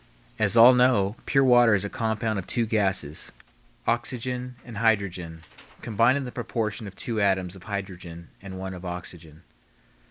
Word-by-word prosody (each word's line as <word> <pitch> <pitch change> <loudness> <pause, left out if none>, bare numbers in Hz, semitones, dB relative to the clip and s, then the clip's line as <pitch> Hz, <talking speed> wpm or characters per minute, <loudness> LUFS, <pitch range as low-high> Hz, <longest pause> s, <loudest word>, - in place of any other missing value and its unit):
As 110 +1 +2
all 120 +3 +9
know, 125 -5 +3
pure 135 -1 +3
water 120 -4 +6
is 100 0 -1
a - - -1
compound 110 -1 -2
of 95 - -8
two 120 -2 0
gases, 95 -9 -1 0.5
oxygen 125 +1 -2
and 120 -4 -9
hydrogen, 95 -7 0 0.4
combined 115 +4 +3
in 140 - -3
the 125 - -6
proportion 115 -3 -3
of 95 - -11
two 115 -3 -3
atoms 95 -2 +1
of 95 - -14
hydrogen 90 -5 -7
and 95 -1 -8
one 95 0 -5
of 90 0 -9
oxygen. 85 -3 -8
105 Hz, 160 wpm, -25 LUFS, 95-120 Hz, 0.5 s, all